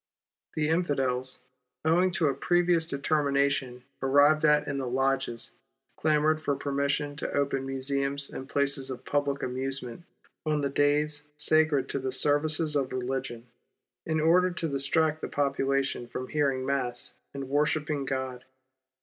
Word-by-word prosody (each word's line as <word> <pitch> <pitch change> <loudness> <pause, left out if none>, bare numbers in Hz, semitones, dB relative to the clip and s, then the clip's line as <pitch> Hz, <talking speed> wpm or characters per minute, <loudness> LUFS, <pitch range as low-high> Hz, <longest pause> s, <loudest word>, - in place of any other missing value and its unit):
The 150 -1 0
Infidels, 135 -6 0 0.4
owing 175 +4 +4
to 160 - +2
a 140 - +2
previous 175 +3 +2
determination 140 -3 0 0.2
arrived 145 +3 +4
at 150 0 +4
in 140 -1 -2
the 130 - -3
lodges, 135 -1 0 0.4
clamoured 155 0 +2
for 145 -2 0
permission 140 +1 -1
to - - -4
open 135 -1 0
museums 140 +1 -1
and 135 +1 -8
places 140 -1 +2
of 130 - -7
public 145 -1 -1
amusement 130 +1 -3 0.4
on 150 -1 0
the 140 - 0
days 145 +1 +1 0.2
sacred 150 -2 +2
to 140 - -2
the 130 0 -3
services 150 +3 +2
of 135 -2 0
religion, 130 -2 -4 0.6
in 160 -1 0
order 175 +4 +4
to 175 -2 -3
distract 150 +2 0
the - - -3
population 135 -3 -1
from 125 +2 -5
the - - -14
hearing 140 -3 +1
of - - -4
Mass 130 -3 -2 0.2
and 140 - -4
the - - -7
worship 150 +1 +1
of 145 -3 -2
God. 130 -2 -4
140 Hz, 150 wpm, -28 LUFS, 135-150 Hz, 0.6 s, owing